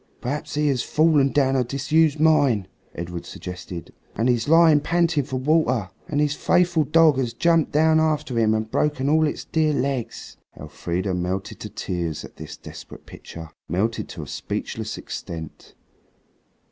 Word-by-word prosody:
"Perhaps 140 +5 -4
he 150 0 +1
has 130 -3 +1
fallen 150 -3 +3
down 135 -2 +2
a 130 - +2
disused 145 +4 +1
mine," 145 -10 +3 0.3
Edred 85 0 -5
suggested, 90 -1 -8 0.2
"and 120 +4 +2
is 120 0 -1
lying 165 -2 +6
panting 165 -1 +1
for 130 0 -6
water, 130 - +1 0.2
and 145 - -1
his 150 -1 +2
faithful 175 0 +2
dog 155 -2 +4
has 120 -3 -2
jumped 165 +3 +2
down 160 +1 +4
after 150 -6 0
him 110 -1 +3
and 110 0 -3
broken 145 -3 0
all 155 +1 +3
its - - -5
dear 155 -2 +1
legs." 135 -4 -3 0.2
Elfrida 90 +3 -3
melted 90 +2 -3
to - - -7
tears 85 -4 -4
at - - -15
this 80 -1 -9
desperate - - -11
picture, 80 -2 -10 0.2
melted 105 +8 -1
to - - -7
a - - -10
speechless - - -5
extent. 80 -2 -8
135 Hz, 160 wpm, -23 LUFS, 110-155 Hz, 0.3 s, lying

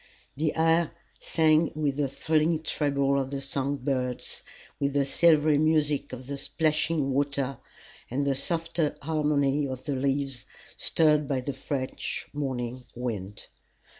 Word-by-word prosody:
The 155 +1 0
air 165 0 +3 0.3
sang 160 0 +3
with 145 -3 0
the 145 -2 +1
thrilling 155 +3 +1
treble 140 -3 +1
of 135 - -4
the 140 0 -3
song 135 +1 -1
birds, 125 -2 -2 0.4
with 140 -1 0
the 140 -1 +2
silvery 150 0 +4
music 150 -2 +2
of 130 0 -7
the 140 +1 -4
plashing 155 -2 +2
water 140 0 -1 0.5
and 140 +3 -1
the 140 - +2
softer 165 +2 -1
harmony 145 -2 +1
of 130 -1 -6
the 145 -3 -1
leaves 135 -2 -1 0.3
stirred 150 -2 +3
by 135 -2 0
the 140 +2 -3
fresh 130 0 -4
morning 130 -3 -3
wind. 105 -5 -4
140 Hz, 135 wpm, -27 LUFS, 135-155 Hz, 0.5 s, silvery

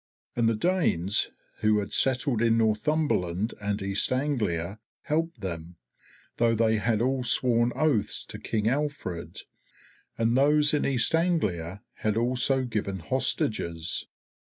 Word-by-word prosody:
And 115 -1 +2
the 115 - +1
Danes 105 - +1 0.3
who 110 0 +3
had 100 -1 -3
settled 130 -3 +2
in 115 -1 +3
Northumberland 110 - 0
and 100 0 -1
East 100 +4 0
Anglia 110 - -1 0.2
helped 160 -5 -2
them, 85 -2 -5 0.6
though 115 -1 +3
they 110 0 +2
had 110 +1 +1
all 130 0 0
sworn 120 -1 +2
oaths 130 -10 0
to - - -7
King 110 -1 -1
Alfred, 135 - -3 0.8
and 115 +1 +1
those 150 +2 +4
in 150 - +1
East 130 -2 +2
Anglia 105 - 0
had 110 0 -1
also 125 +3 +2
given 105 -5 -3
hostages. 80 0 -1
115 Hz, 130 wpm, -27 LUFS, 100-135 Hz, 0.8 s, those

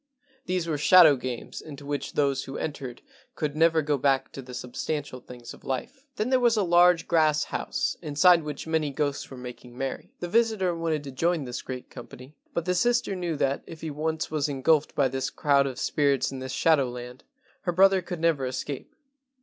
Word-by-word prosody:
These 180 -1 0
were 155 -3 -2
shadow 165 -1 +7
games 125 -2 -6
into 145 -2 -10
which 145 0 -4
those 140 -2 +1
who 135 - -6
entered 135 -5 -5 0.3
could 150 -1 -2
never 160 0 +3
go 145 -1 0
back 135 0 +1
to 135 - -7
the 125 -1 -10
substantial 130 +2 -4
things 120 -1 -11
of - - -16
life. 260 - -5
Then 215 +5 -1
there 260 - +4
was 240 -2 +3
a 210 - +3
large 175 -1 +4
grass 155 -3 +3
house 270 0 -2
inside 170 +3 +4
which 150 -2 -6
many 160 -2 0
ghosts 145 0 -2
were 130 - -9
making 125 0 -10
merry. 135 0 -5
The 175 - -4
visitor 220 -3 +2
wanted 165 -3 -1
to 140 - -7
join 165 +4 0
this 125 -1 -5
great 130 -1 -7
company, 130 +4 -11 0.2
but 170 - -2
the 180 - +1
sister 240 +1 +1
knew 175 -3 -2
that, 140 -1 0
if 160 - -10
he 160 - -4
once 155 +2 -2
was 150 -1 0
engulfed 145 +2 +1
by 140 - +3
this 130 0 -2
crowd 140 -1 +2
of 130 -2 -6
spirits 140 -2 +1
in 135 - -6
this 130 0 -5
shadow 145 -5 +3
land, 125 +1 -9 0.4
her 175 - -1
brother 190 +2 +5
could 175 -1 -6
never 160 -5 +1
escape. 130 +2 -5
150 Hz, 200 wpm, -26 LUFS, 135-170 Hz, 0.4 s, shadow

